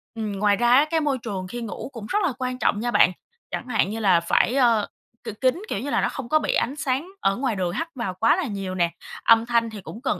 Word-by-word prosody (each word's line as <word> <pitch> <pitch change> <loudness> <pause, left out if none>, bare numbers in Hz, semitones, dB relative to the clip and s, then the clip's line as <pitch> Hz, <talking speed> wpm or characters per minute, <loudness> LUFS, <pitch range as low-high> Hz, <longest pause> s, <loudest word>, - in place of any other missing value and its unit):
Ừm, 220 -2 -3
ngoài 205 0 +3
ra 240 +2 +2
á, 285 +3 +6
cái 325 - +2
môi 285 -3 0
trường 195 -6 -5
khi 240 +4 -6
ngủ 220 +2 -6
cũng 225 -3 -7
rất 415 - +1
là 310 -8 +1
quan 255 0 -2
trọng 205 - +1
nha 240 +2 -1
bạn. 185 - +5 0.4
Chẳng 255 - -4
hạn 220 -5 +1
như 220 +2 -4
là 190 -5 +4
phải, 195 +8 +2
ơ, 235 -5 +3 0.4
k 215 - -10
kín, 260 +8 +2
kiểu - - -2
như 270 +6 -4
là - - +1
nó - - +1
không 260 -3 -7
có 310 - +4
bị - - -1
ánh 260 +4 0
sáng 285 +2 -2
ở 195 0 +2
ngoài 250 -4 -1
đường 180 -2 -1
hắt 325 +9 -3
vào 230 -7 -3
quá 225 - +3
là 370 - -1
nhiều 195 -4 -4
nè. 170 -2 +1 0.3
Âm 230 0 +5
thanh 235 -1 +1
thì 210 -3 -9
cũng 220 - -10
cần 265 - -1
230 Hz, 275 wpm, -24 LUFS, 205-260 Hz, 0.4 s, á